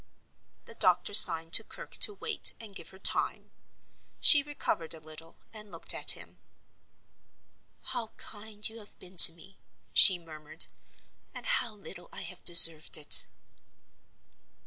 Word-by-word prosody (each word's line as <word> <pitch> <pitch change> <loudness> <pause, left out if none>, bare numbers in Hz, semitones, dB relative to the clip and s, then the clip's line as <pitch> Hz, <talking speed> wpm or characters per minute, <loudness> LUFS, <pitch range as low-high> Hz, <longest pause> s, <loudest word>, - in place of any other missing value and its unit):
The - - -14
doctor 185 -2 -3
signed 165 -6 +6
to 225 - +3
Kirke - - -11
to 420 - +2
wait 445 +2 -3
and 220 -3 -16
give 170 - -14
her 190 - -21
time. 190 - 0 0.7
She 290 - +6
recovered 275 - -8
a - - -16
little 155 +1 -18 0.2
and 210 -2 -16
looked 165 - -3
at - - +1
him. - - -17 1.4
"How 245 -3 -9
kind 210 0 -8
you 225 +1 -14
have 210 - -17
been 185 0 -18
to 165 - +9
me!" 180 +4 -22 0.3
she 185 - +4
murmured. 155 -3 -8 0.7
"And - - -13
how 250 - -6
little 195 -3 -16
I - - -12
have 185 -1 -16
deserved 165 -3 +4
it!" 150 - +2
190 Hz, 145 wpm, -24 LUFS, 165-220 Hz, 1.4 s, to